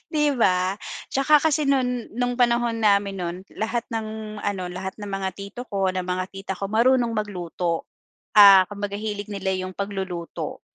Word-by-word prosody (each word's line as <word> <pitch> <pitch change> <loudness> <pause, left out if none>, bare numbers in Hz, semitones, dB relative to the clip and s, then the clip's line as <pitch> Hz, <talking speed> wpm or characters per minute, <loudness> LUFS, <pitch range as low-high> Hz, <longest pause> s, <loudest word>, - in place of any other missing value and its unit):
'Di 300 -1 +2
ba? 185 -3 +3 0.4
Tsaka 285 +3 +4
kasi 305 -2 +2
no'n, 250 -3 0
no'ng 245 +1 0
panahon 235 -1 +2
namin 200 -2 +3
no'n, 175 -1 -3 0.2
lahat 225 +2 -1
ng 220 -1 -5
ano, 200 -3 -2
lahat 190 +1 -5
ng 205 -1 -6
mga 195 -1 -2
tito 200 +4 -8
ko, 195 -3 0
ng 185 -1 -3
mga 180 0 -1
tita 195 0 -5
ko, 195 +1 -5
marunong 240 +2 +3
magluto. 180 -5 -3 0.5
Ah, 195 -2 +9
kumbaga 205 0 -5
hilig 205 0 -4
nila 195 -1 -2
'yong 185 0 -4
pagluluto, 190 -4 -5
205 Hz, 160 wpm, -24 LUFS, 190-230 Hz, 0.5 s, Ah